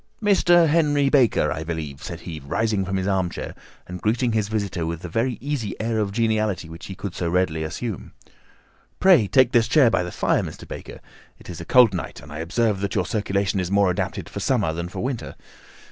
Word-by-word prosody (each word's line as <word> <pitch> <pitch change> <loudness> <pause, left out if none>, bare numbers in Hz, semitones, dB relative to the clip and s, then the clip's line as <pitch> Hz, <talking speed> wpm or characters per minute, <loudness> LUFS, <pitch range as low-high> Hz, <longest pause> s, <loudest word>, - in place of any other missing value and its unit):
"Mr. 175 -5 +4
Henry 145 -3 +3
Baker, 130 -7 +3
I 80 - -3
believe," 80 -4 -5
said 85 -1 -7
he, 80 -3 -7
rising 100 +8 -1
from 95 +1 -3
his 95 - -2
armchair 95 -3 -2 0.3
and 90 0 -8
greeting 115 +3 +1
his 110 -2 0
visitor 100 -5 -2
with 85 0 -4
the 115 +8 -1
easy 135 -5 -4
air 110 0 -1
of 105 -2 -1
geniality 110 -5 0
which 85 +1 -10
he 95 - -7
could 95 -1 -6
so 85 -2 -2
readily 85 -3 0
assume. 100 +6 -5 0.9
"Pray 180 - +5
take 130 +2 +4
this 115 -1 +3
chair 125 -2 +5
by - - +2
the 90 0 -4
fire, - - +1
Mr. - - -8
Baker. - - -9 0.4
It - - -11
is 85 - -8
a - - -7
cold 125 -2 +6
night, 90 -8 -5
and 70 - -13
I 75 - -6
observe 100 +5 0
that 100 0 -3
your 95 -3 +1
circulation 100 -2 -1
is 90 -2 -2
more 100 -1 +3
adapted - - -3
for - - -6
summer 80 - +1
than 85 +1 -4
for - - -6
winter. 130 -2 -4
100 Hz, 205 wpm, -23 LUFS, 90-120 Hz, 0.9 s, cold